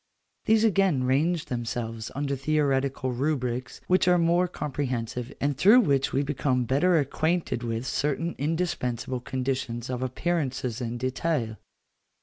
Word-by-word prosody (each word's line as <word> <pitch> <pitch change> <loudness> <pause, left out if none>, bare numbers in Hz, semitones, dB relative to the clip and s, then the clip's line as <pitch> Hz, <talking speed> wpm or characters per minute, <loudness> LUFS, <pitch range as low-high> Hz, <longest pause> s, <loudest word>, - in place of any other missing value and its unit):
These 220 0 +4
again 195 - +3
range 150 +6 +1
themselves 115 -2 -4
under 140 0 -1
theoretical 135 -2 0
rubrics 125 -2 -2
which 185 0 +3
are 180 0 +5
more 170 +2 +3
comprehensive, 125 -7 -3
and 145 0 0
through 210 - +7
which 140 - +1
we 140 - +1
become 135 -3 0
better 155 +8 +3
acquainted 155 -1 0
with 115 0 -3
certain 150 +5 -1
indispensable 130 -6 -1
conditions 130 -2 -3
of 125 0 -3
appearances 130 -3 -2
in 120 0 -3
detail. 130 -2 -1
135 Hz, 130 wpm, -27 LUFS, 125-165 Hz, -, through